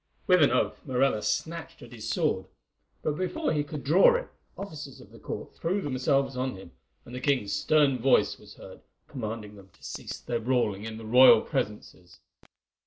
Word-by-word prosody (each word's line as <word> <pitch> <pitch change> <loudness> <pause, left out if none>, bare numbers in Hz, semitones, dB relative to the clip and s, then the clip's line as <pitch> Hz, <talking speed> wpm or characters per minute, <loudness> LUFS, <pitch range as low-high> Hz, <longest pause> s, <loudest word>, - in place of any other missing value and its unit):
With 180 -2 +5
an 145 - +6
oath 125 - 0
Morella 130 -4 +1
snatched 160 +9 -3
at 120 - -13
his 110 -2 -7
sword; - - 0 0.6
but, 150 +1 -2
before 305 - -1
he 150 -1 0
could 150 -1 -7
draw 175 - +5
it, - - -3 0.3
officers 155 -9 -8
of - - -15
the - - -14
court - - -7
threw 185 +5 -1
themselves 135 -3 0
on 130 -1 -2
him, 95 -2 -12 0.3
and 120 - -12
the 125 - -4
king's 125 -7 0
stern 135 +5 +2
voice 130 +2 +3
was - - -15
heard - - -13 0.3
commanding 110 -3 -6
them 95 -1 -15
to - - -25
cease - - -7
their 120 -1 -3
brawling 110 -4 0
in 110 0 -6
the 110 - -9
royal 125 0 +7
presences. 90 -4 -5
130 Hz, 180 wpm, -27 LUFS, 110-150 Hz, 0.6 s, royal